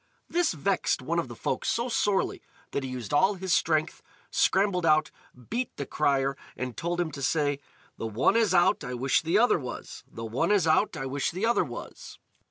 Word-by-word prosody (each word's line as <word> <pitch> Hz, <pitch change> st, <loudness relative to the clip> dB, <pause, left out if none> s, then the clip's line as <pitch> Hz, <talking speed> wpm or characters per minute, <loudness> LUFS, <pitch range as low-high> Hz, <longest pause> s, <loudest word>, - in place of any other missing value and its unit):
This 345 Hz, -1 st, +1 dB
vexed -, -, 0 dB
one -, -, 0 dB
of -, -, -2 dB
the -, -, -9 dB
folk -, -, -2 dB
so 235 Hz, +2 st, 0 dB
sorely 205 Hz, -5 st, 0 dB, 0.3 s
that 140 Hz, -, -2 dB
he 130 Hz, -, -4 dB
used 125 Hz, -1 st, -6 dB
all 190 Hz, +7 st, +4 dB
his 190 Hz, -1 st, -1 dB
strength, 155 Hz, -1 st, +1 dB, 0.3 s
scrambled 190 Hz, -2 st, +2 dB
out, 155 Hz, -1 st, +3 dB, 0.4 s
beat 245 Hz, +2 st, -2 dB
the -, -, -3 dB
crier, 140 Hz, -2 st, +1 dB, 0.2 s
and 125 Hz, -2 st, -4 dB
told 175 Hz, +5 st, -2 dB
him 170 Hz, -3 st, 0 dB
to 140 Hz, -1 st, -7 dB
say. 145 Hz, 0 st, +1 dB, 0.4 s
"The 115 Hz, -, -3 dB
one 110 Hz, -, +2 dB
is 225 Hz, -4 st, +3 dB
out, 175 Hz, -1 st, +3 dB
I 125 Hz, 0 st, -4 dB
wish 130 Hz, +2 st, +2 dB
the 165 Hz, +4 st, +1 dB
other 235 Hz, -5 st, +4 dB
was! 125 Hz, -4 st, -7 dB
The 115 Hz, -, -7 dB
one 115 Hz, -, 0 dB
is 200 Hz, -5 st, +3 dB
out, 160 Hz, +3 st, +2 dB
I 135 Hz, -, -4 dB
wish 135 Hz, +1 st, -1 dB
the 185 Hz, +6 st, -2 dB
other 235 Hz, +1 st, +3 dB
was!" -, -, -9 dB
160 Hz, 200 wpm, -27 LUFS, 135-195 Hz, 0.4 s, all